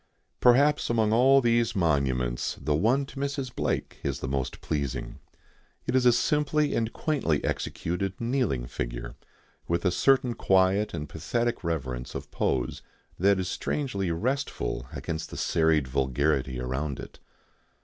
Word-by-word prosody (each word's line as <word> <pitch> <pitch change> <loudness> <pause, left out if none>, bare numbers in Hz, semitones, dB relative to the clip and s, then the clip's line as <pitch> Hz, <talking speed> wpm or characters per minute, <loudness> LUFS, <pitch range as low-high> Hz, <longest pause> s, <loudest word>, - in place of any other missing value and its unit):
Perhaps 140 +4 +4
among 110 -2 +2
all 135 +4 +6
these 120 -2 +2
monuments 65 -8 0
the 75 +2 0
one 115 - +2
to 135 - -13
Mrs. 140 -3 -3
Blake - - -2
is 70 -2 -2
the - - -4
most 65 -1 -2
pleasing. 70 -4 -3 0.7
It - - -1
is 125 -1 +4
a - - +8
simply 150 +4 +1
and 115 0 0
quaintly 130 - 0
executed 95 +3 -2
kneeling 115 - 0
figure, - - -5 0.5
with 85 +2 0
a 90 - +4
certain 130 +5 +3
quiet 95 0 +2
and 75 - -4
pathetic 115 - -2
reverence 65 -7 -3
of - - -6
pose 65 -2 -1 0.4
that 100 +1 +4
is 90 - -2
strangely 100 -5 -2
restful 105 - -2
against 80 0 -4
the - - -8
serried 80 -4 +2
vulgarity 65 0 0
around 65 +3 -3
it. - - -10
90 Hz, 140 wpm, -27 LUFS, -, 0.7 s, a